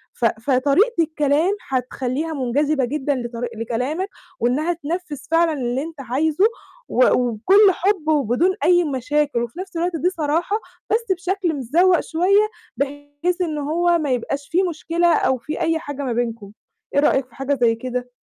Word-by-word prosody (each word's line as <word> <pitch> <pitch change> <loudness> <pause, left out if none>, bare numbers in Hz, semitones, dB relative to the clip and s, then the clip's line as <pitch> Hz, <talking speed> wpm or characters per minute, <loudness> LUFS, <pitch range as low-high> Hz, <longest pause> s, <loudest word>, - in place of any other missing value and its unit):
ف 240 - -1
فطريقة 275 - +2
الكلام 310 +4 +1
هتخليها 260 +4 -2
منجذبة 280 +1 0
جدًا 285 +2 -1
لطري 240 -1 -4
لكلامك 250 - -2 0.3
وإنها 290 +9 +1
تنفذ 330 -1 -5
فعلًا 330 -1 +3
اللي 255 -1 -2
أنت 320 -3 -8
عايزه 295 - +1 0.4
و 255 - +4
وبكل 295 - +4
حب 365 -3 0
وبدون 300 - +2
أي 350 0 +5
مشاكل، 290 -1 0
وفي 240 +9 -7
نفْس 380 -2 -6
الوقت 345 +1 -1
دي 345 +4 +1
صراحة 335 +3 -1 0.3
بس 460 +1 +1
بشكل 370 -2 -1
متذوَق 330 +7 +3
شوية 395 +6 +2 0.3
بحيث 290 +6 -3
إن 315 -4 -1
هو 340 +4 +1
ما 295 -4 -1
يبقاش 275 +3 -2
فيه 365 +2 +2
مشكلة 335 +1 +1
أو 260 - +2
فيه 305 +7 -6
أي 325 -1 +1
حاجة 285 -3 -6
ما 255 -3 -1
بينكم، 230 -4 -3 0.4
إيه - - +5
رأيك 270 -2 +3
في 245 - -22
حاجة 275 +1 -1
زي 230 -1 +4
كده؟ 250 +1 -4
295 Hz, 160 wpm, -21 LUFS, 255-345 Hz, 0.4 s, أي